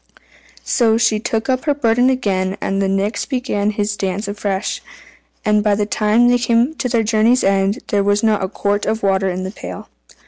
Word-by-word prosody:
So 225 Hz, -3 st, +2 dB
she 230 Hz, -2 st, +2 dB
took 220 Hz, 0 st, -2 dB
up 255 Hz, +1 st, -1 dB
her 290 Hz, -2 st, +1 dB
burden 245 Hz, -1 st, +2 dB
again, 195 Hz, -7 st, -1 dB
and 195 Hz, 0 st, -1 dB
the 195 Hz, -, +1 dB
Nix 200 Hz, +2 st, -1 dB
began 250 Hz, -6 st, -1 dB
his 210 Hz, 0 st, -2 dB
dance 195 Hz, +1 st, -3 dB
afresh, 200 Hz, -1 st, -3 dB, 0.6 s
and 210 Hz, 0 st, +2 dB
by 210 Hz, -1 st, +2 dB
the 205 Hz, 0 st, 0 dB
time 215 Hz, +3 st, +2 dB
they 245 Hz, 0 st, +3 dB
came 235 Hz, +4 st, +2 dB
to 250 Hz, -, -2 dB
their 230 Hz, -2 st, +1 dB
journey's 225 Hz, +3 st, +2 dB
end, 195 Hz, +1 st, +1 dB
there 200 Hz, -1 st, +1 dB
was 205 Hz, +1 st, +1 dB
not 215 Hz, -3 st, +2 dB
a -, -, 0 dB
quart 205 Hz, 0 st, -1 dB
of 220 Hz, -1 st, -1 dB
water 195 Hz, -1 st, +1 dB
in 185 Hz, +1 st, -3 dB
the 190 Hz, -, -5 dB
pail. -, -, -9 dB
210 Hz, 200 wpm, -18 LUFS, 200-230 Hz, 0.6 s, they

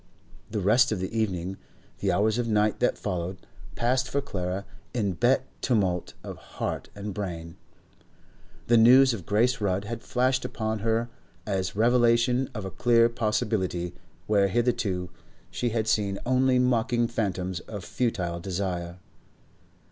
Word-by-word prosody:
The 105 Hz, -1 st, -2 dB
rest 120 Hz, +6 st, +4 dB
of 110 Hz, -, -1 dB
the 95 Hz, +4 st, -4 dB
evening, 95 Hz, -4 st, -1 dB, 0.4 s
the 100 Hz, -, +1 dB
hours 105 Hz, +5 st, +2 dB
of 120 Hz, -, -1 dB
night 105 Hz, -1 st, +2 dB
that -, -, +1 dB
followed, 90 Hz, +1 st, -3 dB, 0.4 s
passed 130 Hz, +2 st, +1 dB
for 140 Hz, -, 0 dB
Clara 95 Hz, -7 st, -3 dB, 0.3 s
in 100 Hz, -6 st, 0 dB
hot 125 Hz, +2 st, +4 dB, 0.2 s
tumult 95 Hz, -8 st, 0 dB
of -, -, -7 dB, 0.2 s
heart -, -, -3 dB
and 100 Hz, 0 st, -5 dB
brain. 85 Hz, -4 st, -5 dB, 1.1 s
The 120 Hz, -, +4 dB
news 130 Hz, +3 st, +7 dB
of 95 Hz, -8 st, -7 dB
Grace 115 Hz, +3 st, +2 dB
Rudd 100 Hz, 0 st, 0 dB
had 115 Hz, +1 st, -5 dB
flashed 130 Hz, 0 st, +1 dB
upon 110 Hz, -2 st, -3 dB
her 115 Hz, +2 st, 0 dB, 0.4 s
as 95 Hz, -1 st, -2 dB
revelation 120 Hz, +2 st, +3 dB
of 105 Hz, -3 st, -4 dB
a 95 Hz, -, -5 dB
clear 115 Hz, +1 st, +4 dB
possibility 105 Hz, -6 st, -1 dB, 0.3 s
where 100 Hz, -2 st, +3 dB
hitherto 100 Hz, -5 st, 0 dB, 0.4 s
she 120 Hz, -, -1 dB
had 110 Hz, -1 st, -1 dB
seen 100 Hz, -3 st, +1 dB
only 130 Hz, +1 st, +3 dB
mocking 120 Hz, -1 st, +2 dB
phantoms 95 Hz, -6 st, -2 dB
of 100 Hz, -4 st, -7 dB
futile 90 Hz, -9 st, -2 dB
desire. 90 Hz, -1 st, -3 dB
110 Hz, 140 wpm, -27 LUFS, 95-120 Hz, 1.1 s, news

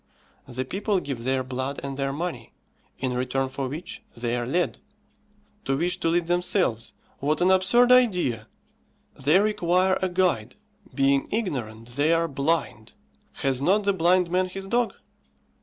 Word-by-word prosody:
The 130 Hz, +1 st, -4 dB
people 200 Hz, -, -1 dB
give 135 Hz, -8 st, -5 dB
their 130 Hz, 0 st, +1 dB
blood 130 Hz, +2 st, -4 dB
and 140 Hz, -1 st, -4 dB
their 135 Hz, 0 st, -1 dB
money, 140 Hz, -6 st, -5 dB, 0.4 s
in 130 Hz, -1 st, -2 dB
return 130 Hz, +1 st, -1 dB
for 135 Hz, 0 st, -4 dB
which 150 Hz, +7 st, -7 dB, 0.2 s
they 120 Hz, 0 st, -1 dB
are 120 Hz, -1 st, -2 dB
led. 175 Hz, +6 st, 0 dB, 0.9 s
To 135 Hz, 0 st, 0 dB
wish 180 Hz, +4 st, -1 dB
to -, -, -1 dB
lead 170 Hz, +1 st, +1 dB
themselves! 175 Hz, -, 0 dB, 0.3 s
what 150 Hz, +3 st, 0 dB
an 180 Hz, +1 st, +4 dB
absurd 215 Hz, +7 st, +4 dB
idea! 180 Hz, -, +3 dB, 0.7 s
They 145 Hz, +6 st, +3 dB
require 190 Hz, -2 st, +2 dB
a 190 Hz, -, 0 dB
guide; 175 Hz, -, 0 dB, 0.4 s
being 140 Hz, 0 st, +2 dB
ignorant, 120 Hz, -, -3 dB
they 145 Hz, +6 st, +2 dB
are 165 Hz, 0 st, +2 dB
blind. 140 Hz, -6 st, -2 dB, 0.5 s
Has 135 Hz, -1 st, +1 dB
not 200 Hz, +8 st, +3 dB
the 200 Hz, 0 st, +2 dB
blind 180 Hz, 0 st, +2 dB
man 185 Hz, +1 st, +2 dB
his 195 Hz, +1 st, -7 dB
dog? 235 Hz, +3 st, 0 dB
155 Hz, 155 wpm, -25 LUFS, 130-185 Hz, 0.9 s, an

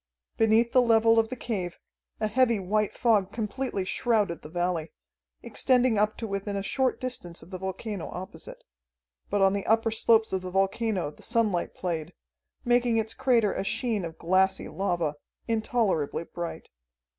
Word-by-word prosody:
Beneath 225 Hz, +1 st, +3 dB
the 255 Hz, -, +5 dB
level 225 Hz, -1 st, +5 dB
of 225 Hz, 0 st, +1 dB
the 255 Hz, -, -4 dB
cave 195 Hz, -8 st, -4 dB, 0.4 s
a 215 Hz, -, 0 dB
heavy 235 Hz, 0 st, +2 dB
white 210 Hz, +2 st, 0 dB
fog 215 Hz, -6 st, +2 dB
completely 220 Hz, -2 st, -3 dB
shrouded 205 Hz, -4 st, 0 dB
the 150 Hz, -, -10 dB
valley, 175 Hz, -2 st, -2 dB, 0.5 s
extending 250 Hz, -4 st, +2 dB
up 215 Hz, +1 st, +1 dB
to 230 Hz, -, -4 dB
within 200 Hz, 0 st, -3 dB
a 195 Hz, -, -2 dB
short 260 Hz, +4 st, 0 dB
distance 180 Hz, -11 st, -4 dB
of 170 Hz, -, -16 dB
the 185 Hz, -, -5 dB
volcano 190 Hz, 0 st, -5 dB
opposite. 185 Hz, +1 st, -9 dB, 0.7 s
But 205 Hz, 0 st, +1 dB
on 195 Hz, 0 st, +4 dB
the 200 Hz, -1 st, -2 dB
upper 225 Hz, +1 st, +3 dB
slopes 220 Hz, -1 st, +3 dB
of 190 Hz, -, 0 dB
the 185 Hz, -, -6 dB
volcano 195 Hz, -2 st, 0 dB
the -, -, -19 dB
sunlight 220 Hz, -7 st, 0 dB
played, 170 Hz, -2 st, -3 dB, 0.5 s
making 240 Hz, -1 st, +3 dB
its 220 Hz, 0 st, -1 dB
crater 230 Hz, -6 st, +2 dB
a -, -, -2 dB
sheen 220 Hz, 0 st, -1 dB
of 165 Hz, -1 st, -6 dB
glassy 190 Hz, +2 st, +2 dB
lava, 175 Hz, -6 st, -1 dB, 0.3 s
intolerably 220 Hz, -, 0 dB
bright. 170 Hz, 0 st, -7 dB
210 Hz, 160 wpm, -27 LUFS, 185-230 Hz, 0.7 s, the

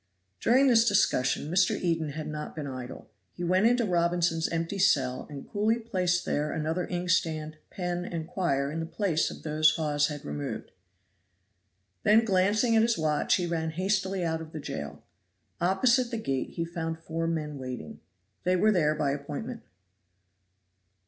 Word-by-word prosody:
During 260 Hz, +4 st, +4 dB
this 235 Hz, -3 st, +5 dB
discussion 150 Hz, -7 st, +1 dB
Mr. 180 Hz, +1 st, +3 dB
Eden 165 Hz, -4 st, -1 dB
had 155 Hz, +1 st, -5 dB
not 150 Hz, 0 st, -6 dB
been 155 Hz, -3 st, -4 dB
idle; 130 Hz, -4 st, -7 dB, 0.2 s
he 175 Hz, -, -6 dB
went 185 Hz, +5 st, +3 dB
into 245 Hz, 0 st, +3 dB
Robinson's 170 Hz, -2 st, +1 dB
empty 165 Hz, +4 st, -2 dB
cell 130 Hz, -9 st, +2 dB
and 140 Hz, -2 st, -8 dB
coolly 215 Hz, +3 st, +1 dB
placed 185 Hz, -6 st, 0 dB
there 150 Hz, +1 st, -1 dB
another 160 Hz, +3 st, -2 dB
inkstand, 165 Hz, -4 st, -1 dB
pen 175 Hz, -1 st, -3 dB
and 165 Hz, -3 st, -4 dB
quire 140 Hz, -7 st, 0 dB
in 160 Hz, -, -3 dB
the 165 Hz, -, -3 dB
place 170 Hz, -3 st, 0 dB
of -, -, -10 dB
those 155 Hz, 0 st, +3 dB
Hawes 150 Hz, -2 st, +1 dB
had 150 Hz, -2 st, -7 dB
removed. 75 Hz, 0 st, -5 dB, 1.3 s
Then 220 Hz, +2 st, +5 dB
glancing 205 Hz, +4 st, +3 dB
at 220 Hz, -, +6 dB
his 230 Hz, 0 st, +2 dB
watch 155 Hz, -2 st, +2 dB
he 180 Hz, -, -1 dB
ran 165 Hz, -1 st, -1 dB
hastily 190 Hz, +2 st, 0 dB
out 160 Hz, -1 st, -1 dB
of 160 Hz, -1 st, -10 dB
the 155 Hz, -, -5 dB
jail. 145 Hz, -, -6 dB, 0.6 s
Opposite 235 Hz, +8 st, +3 dB
the 235 Hz, -, -3 dB
gate 135 Hz, -11 st, -2 dB
he 165 Hz, -, -1 dB
found 165 Hz, -1 st, -4 dB
four 165 Hz, 0 st, -3 dB
men 150 Hz, -3 st, -3 dB
waiting; 125 Hz, -11 st, -7 dB, 0.4 s
they 180 Hz, +1 st, +2 dB
were 215 Hz, +4 st, +4 dB
there 155 Hz, -6 st, +2 dB
by 145 Hz, -2 st, 0 dB
appointment. 150 Hz, -, -5 dB
170 Hz, 160 wpm, -28 LUFS, 155-190 Hz, 1.3 s, at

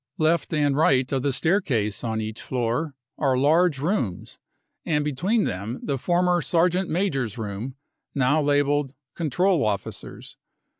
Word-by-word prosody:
s< 135 Hz, -, -53 dB
Left 165 Hz, +2 st, +2 dB
and 145 Hz, -3 st, +2 dB
right 135 Hz, -4 st, +3 dB
of 135 Hz, -2 st, 0 dB
the 140 Hz, +1 st, +1 dB
staircase 130 Hz, -, 0 dB
on 110 Hz, -2 st, -1 dB
each 110 Hz, 0 st, -5 dB
floor 130 Hz, +4 st, -2 dB, 0.2 s
are 135 Hz, -3 st, +2 dB
large 155 Hz, +3 st, +3 dB
rooms, 135 Hz, -, -2 dB, 0.4 s
and 150 Hz, -2 st, 0 dB
between 180 Hz, -, +1 dB
them 100 Hz, +7 st, -3 dB
the 140 Hz, -3 st, -2 dB
former 175 Hz, +2 st, +2 dB
sergeant 180 Hz, +3 st, +1 dB
major's 135 Hz, -, -1 dB
room, 110 Hz, +4 st, -5 dB, 0.4 s
now 140 Hz, +3 st, +3 dB
labelled 145 Hz, 0 st, +2 dB
6 135 Hz, -, -24 dB, 0.2 s
control 175 Hz, +2 st, +1 dB
officers. 105 Hz, -3 st, -4 dB
145 Hz, 145 wpm, -24 LUFS, 125-165 Hz, 0.4 s, right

